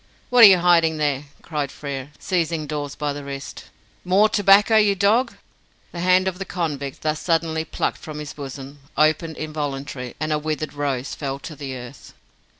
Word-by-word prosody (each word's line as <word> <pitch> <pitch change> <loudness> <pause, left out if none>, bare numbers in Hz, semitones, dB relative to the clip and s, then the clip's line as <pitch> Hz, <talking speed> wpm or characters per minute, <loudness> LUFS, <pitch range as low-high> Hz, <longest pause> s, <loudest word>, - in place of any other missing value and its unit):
"What 245 -1 +7
are - - +14
you 190 -2 +7
hiding 170 -2 +3
there?" 145 -2 0 0.2
cried 150 -4 -3
Frere, 140 -2 -6
seizing 165 -3 -1
Dawes 145 -2 -4
by 145 -1 -2
the 145 0 -7
wrist. 140 -1 -7 0.4
"More 195 +4 +4
tobacco, 205 +2 +5
you 210 -2 +4
dog?" 210 +6 +2 0.6
The 175 - -7
hand 185 +1 +3
of 185 0 -3
the - - -2
convict, 150 -7 -4
thus 155 0 0
suddenly 165 -2 0
plucked - - -3
from 155 -1 -8
his 150 -1 -6
bosom, 140 0 -8 0.2
opened 155 +1 +2
involuntarily, 140 -4 -5
and 155 0 -1
a 150 - 0
withered 155 0 -3
rose 140 -2 -2
fell 135 -2 -4
to 155 - -8
the 135 -2 -6
earth. 125 +1 -11
155 Hz, 175 wpm, -22 LUFS, 140-175 Hz, 0.6 s, are